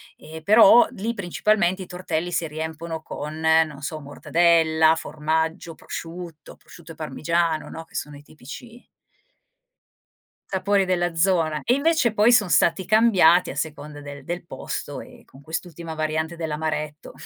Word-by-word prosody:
E, 160 +1 -11
però, 220 +4 +7
lì 225 +4 -3
principalmente 190 0 0
i 180 - -12
tortelli 175 -1 -3
si 165 -1 -1
riempiono 160 +1 -5
con, 155 0 -7
non 160 -2 +2
so, 155 +3 -5
mortadella, 160 +2 +3
formaggio, 160 +2 -2
prosciutto, 165 -2 -9
prosciutto 170 -1 -15
e - - -18
parmigiano, 165 +1 -1
no, 165 - -8
che - - -21
sono 150 0 -5
i - - -14
tipici 225 - -12 1.6
sapori 195 +1 +1
della 175 -1 0
zona. 165 -3 +1
E 245 - +2
invece 285 -4 +2
poi 215 +3 +4
son 210 -6 +4
stati 170 +2 +3
cambiati 200 -6 +4
a - - -6
seconda 150 -1 -5
del 145 -1 -9
del 175 +2 -5
posto 135 - -6
e - - -15
con 135 - -17
quest'ultima 165 +1 -6
variante 155 +1 -2
dell'amaretto. 155 -1 -4
165 Hz, 145 wpm, -23 LUFS, 155-185 Hz, 1.6 s, però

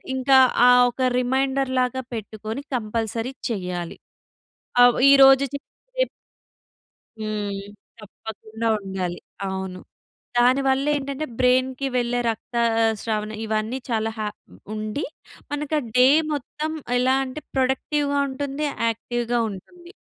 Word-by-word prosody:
ఇంకా 265 +1 +4 0.3
ఆహ్, 250 0 +7
ఒక 260 - -7 0.2
రిమైండర్‌లాగా 260 0 0
పెట్టుకొని 220 +2 -5
కంపల్సరీ 230 +2 -2 0.2
చెయ్యాలి. 180 -5 -4 0.9
ఆవ్ 245 -1 +6 0.2
ఈరోజు 270 -1 +8
చేసి 280 - -6 0.3
రేపు - - +2 1.1
హ్మ్. 210 -2 -3 0.5
తప్పకుండా 220 +2 -6
ఉండాలి. 190 -3 -4 0.3
అవును. 190 -1 -4 0.6
దానివల్లేం‌టంటే 275 +3 +2
బ్రెయిన్‌కి 255 +1 +2
వెళ్ళే 245 0 +1
రక్తస్రావణ 225 -2 0
ఇవన్నీ 220 +3 -1
చాలా 225 -1 0
హ - - -3 0.5
ఉండి, 215 +5 -3 0.5
మనకు 295 +1 -2
ఆహ్, 250 - -7
డే 250 +1 +7 0.3
మొత్తం 300 +2 -4 0.3
ఎలా 255 +1 +3
అంటే 265 +4 -7
ప్రొడక్టివ్‌గా 280 +2 +1
ఉంటుంది. 280 +2 -3 0.2
యాక్టివ్‌గా 240 +1 -2
ఉంటుంది. 345 - -11
245 Hz, 100 wpm, -23 LUFS, 220-270 Hz, 1.1 s, ఈరోజు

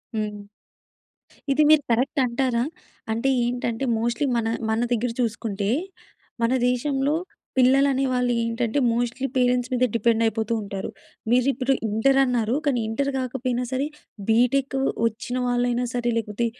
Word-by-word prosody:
హ్మ్. 210 -1 -4 1.0
ఇది 300 +2 +4
మీరు 310 -2 +6
కరెక్ట్ 255 +4 +1
అంటారా? 240 -1 0 0.5
అంటే 230 +5 0
ఏంటంటే, 240 0 -2 0.2
మోస్ట్‌లీ 235 +5 0
మన 225 -1 0 0.2
మన 220 +1 +1
దగ్గర 240 0 0
చూసుకుంటే, 215 -3 -2 0.7
మన 230 +2 +2 0.2
దేశంలో 275 +3 0 0.4
పిల్లలు 265 +2 +5
అనేవాళ్ళు 255 -2 +1
ఏంటంటే, 230 +3 -1
మోస్ట్‌లీ 245 +3 -1
పేరెంట్స్ 250 0 +2
మీద 250 0 +1
డిపెండ్ 230 0 +2
అయిపోతూ 225 0 0
ఉంటారు. 200 -1 -5 0.4
మీరు 250 +2 +3
ఇప్పుడు 260 +2 -1 0.2
ఇంటర్ 270 +6 +2
అన్నారు, 240 -1 0
కానీ 260 -4 +2
ఇంటర్ 280 +5 -1
కాకపోయినా 250 -1 -2
సరే 260 +2 0 0.4
బీటెక్ 255 +4 +2 0.3
వచ్చిన 230 +3 -4
వాళ్ళైనా 245 0 +1
సరే, 240 -1 0
లేకపోతే 220 +1 -2
245 Hz, 130 wpm, -24 LUFS, 230-260 Hz, 1.0 s, మీరు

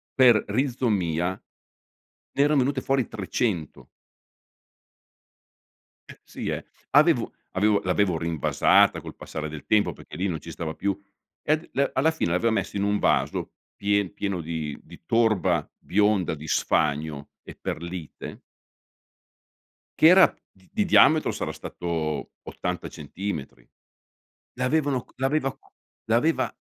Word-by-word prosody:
per 120 -5 +6
rizomia, 105 - 0
ne 95 - -16 0.8
erano 150 0 +4
venute 135 +1 0
fuori 135 -2 0
300. 95 -5 -3 2.2
Eh, - - -12
sì, - - -7
eh! - - -3 0.3
Avevo - - +4 0.2
avevo 105 +2 +2
l'avevo 90 -2 +1
rinvasata 85 -2 +3
col - - -10
passare 75 0 -6
del 75 -1 -8
tempo 105 -1 +2
perché - - -13
lì 95 - 0
non 85 -4 -2
ci - - -11
stava 80 -1 -5
più. 100 +2 -2 0.4
Ed 155 +2 0
le 140 +1 +1
alla 145 +5 +3
fine 160 - -1
l'avevo 110 +6 +2
messo 100 -1 -2
in 100 - 0
un 100 0 +2
vaso - - 0 0.2
pie 100 -1 +1
pieno 100 -3 -3
di 80 -3 -4
di - - -15
torba 95 -8 +2
bionda, 105 -3 +1
di 80 0 -8
sfagno 75 -1 0
e - - -11
perlite 85 -1 -6 1.6
che 160 - +8
era 185 +2 +7 0.2
di 95 - -4
diametro 160 -3 +5
sarà - - -3
stato 80 -4 -4
80 - - -4
centimetri. 75 -6 -6 0.9
L'avevano 135 0 +1
c - - -26
l'aveva 135 +1 0
c - - -28 0.5
l'aveva 120 +9 +2
100 Hz, 125 wpm, -25 LUFS, 85-125 Hz, 2.2 s, che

